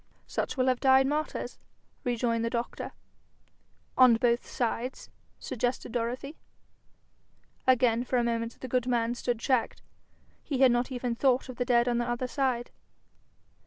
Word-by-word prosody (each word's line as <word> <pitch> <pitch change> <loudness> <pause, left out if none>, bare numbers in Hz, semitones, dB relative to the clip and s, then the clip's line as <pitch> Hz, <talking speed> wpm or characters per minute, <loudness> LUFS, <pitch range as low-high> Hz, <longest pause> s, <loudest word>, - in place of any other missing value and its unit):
'Such - - -3
will 255 - +2
have 255 -1 +2
died 265 0 +5
martyrs,' 300 +3 -3 0.4
rejoined 235 -1 0
the 230 - 0
doctor. 235 0 -4 1.0
'On 255 -3 +7
both 235 +1 +1
sides?' 245 +1 -3 0.3
suggested 245 0 -3
Dorothy. 250 +5 -3 1.3
Again 245 -2 +4
for 255 0 -1
a 240 - +2
moment 230 0 -2
the 260 - -5
good 250 0 0
man 235 -1 +1
stood 245 -1 -2
checked. 250 +1 0 0.6
He 280 - -2
had 260 -2 +7
not 240 +2 0
even 245 -1 -2
thought 255 +1 +1
of 250 - -8
the 245 - -1
dead 240 -1 +3
on 240 -1 +1
the 240 0 -1
other 240 +1 -1
side. 250 -2 -1
245 Hz, 150 wpm, -29 LUFS, 235-255 Hz, 1.3 s, On